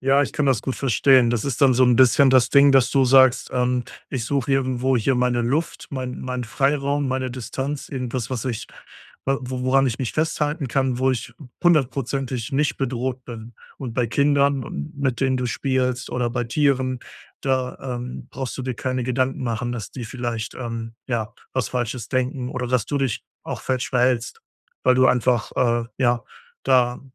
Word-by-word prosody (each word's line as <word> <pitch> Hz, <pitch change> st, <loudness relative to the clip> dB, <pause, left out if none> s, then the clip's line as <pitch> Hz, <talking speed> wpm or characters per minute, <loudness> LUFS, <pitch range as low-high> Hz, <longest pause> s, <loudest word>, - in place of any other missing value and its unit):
Ja, 135 Hz, +2 st, +4 dB
ich -, -, -3 dB
kann 150 Hz, -, 0 dB
das 130 Hz, -6 st, +2 dB
gut 130 Hz, -, -3 dB
verstehen. 130 Hz, -1 st, +4 dB
Das 120 Hz, -3 st, -1 dB
ist 140 Hz, +1 st, -3 dB
dann 135 Hz, -2 st, +6 dB
so 130 Hz, -, +4 dB
'n 125 Hz, -2 st, +4 dB
bisschen 130 Hz, +2 st, +6 dB
das 130 Hz, -1 st, +4 dB
Ding, 140 Hz, 0 st, +6 dB
dass 130 Hz, -2 st, +4 dB
du 135 Hz, -1 st, +3 dB
sagst: 130 Hz, -1 st, +5 dB
„Ähm, 125 Hz, -1 st, +1 dB, 0.3 s
ich 125 Hz, -4 st, -2 dB
suche 140 Hz, 0 st, -1 dB
irgendwo 130 Hz, -1 st, +1 dB
hier 125 Hz, +4 st, +1 dB
meine 125 Hz, -1 st, +1 dB
Luft, 145 Hz, +7 st, -1 dB
mein 130 Hz, -2 st, -5 dB
meinen 125 Hz, -1 st, -3 dB
Freiraum, 140 Hz, +2 st, 0 dB
meine 130 Hz, -1 st, -1 dB
Distanz, 135 Hz, +3 st, -4 dB
irgendwas, 125 Hz, -3 st, -3 dB
was 125 Hz, -2 st, -3 dB
ich 115 Hz, -6 st, -3 dB, 0.6 s
w 135 Hz, 0 st, +1 dB
woran 130 Hz, +1 st, +1 dB
ich 115 Hz, -, -2 dB
mich 130 Hz, -4 st, -3 dB
festhalten 150 Hz, -2 st, -1 dB
kann, 130 Hz, -1 st, 0 dB
wo 130 Hz, 0 st, +3 dB
ich 120 Hz, -1 st, -3 dB, 0.3 s
hundertprozentig 135 Hz, -5 st, 0 dB
nicht 145 Hz, +2 st, +1 dB
bedroht 130 Hz, -1 st, -3 dB
bin.“ 115 Hz, -1 st, -9 dB, 0.2 s
Und 125 Hz, -4 st, -6 dB
bei 120 Hz, -2 st, +1 dB
Kindern 140 Hz, +1 st, +2 dB
und 70 Hz, -9 st, -6 dB
mit 130 Hz, -3 st, -1 dB
denen 130 Hz, -1 st, +2 dB
du 125 Hz, -, -1 dB
spielst, 130 Hz, -1 st, -1 dB
oder 125 Hz, -1 st, 0 dB
bei 120 Hz, 0 st, -2 dB
Tieren, 130 Hz, -1 st, +1 dB, 0.4 s
da, 130 Hz, -2 st, -1 dB
ähm, 125 Hz, -1 st, -6 dB
brauchst 130 Hz, +1 st, -5 dB
du -, -, -3 dB
dir 130 Hz, -1 st, -3 dB
keine 130 Hz, 0 st, -2 dB
Gedanken 130 Hz, +1 st, -1 dB
machen, 120 Hz, 0 st, -2 dB
dass 110 Hz, -7 st, -6 dB
die 125 Hz, -3 st, -7 dB
vielleicht, 120 Hz, -1 st, -4 dB
ähm, 115 Hz, -2 st, -5 dB
ja, 115 Hz, -4 st, -2 dB, 0.2 s
was 130 Hz, -5 st, -1 dB
Falsches 120 Hz, -1 st, -3 dB
denken 130 Hz, -1 st, -1 dB
oder 125 Hz, -1 st, -3 dB
dass 125 Hz, -3 st, +1 dB
du 145 Hz, -, -1 dB
dich 135 Hz, -5 st, -1 dB, 0.2 s
auch -, -, -5 dB
falsch 130 Hz, -1 st, -1 dB
verhältst, 125 Hz, -2 st, +1 dB, 0.4 s
weil 130 Hz, 0 st, +5 dB
du 130 Hz, 0 st, +5 dB
einfach, 125 Hz, -2 st, +2 dB
äh, 120 Hz, -1 st, +2 dB
ja, 120 Hz, -2 st, +2 dB, 0.4 s
da 125 Hz, -2 st, +3 dB
130 Hz, 185 wpm, -23 LUFS, 120-135 Hz, 0.6 s, dann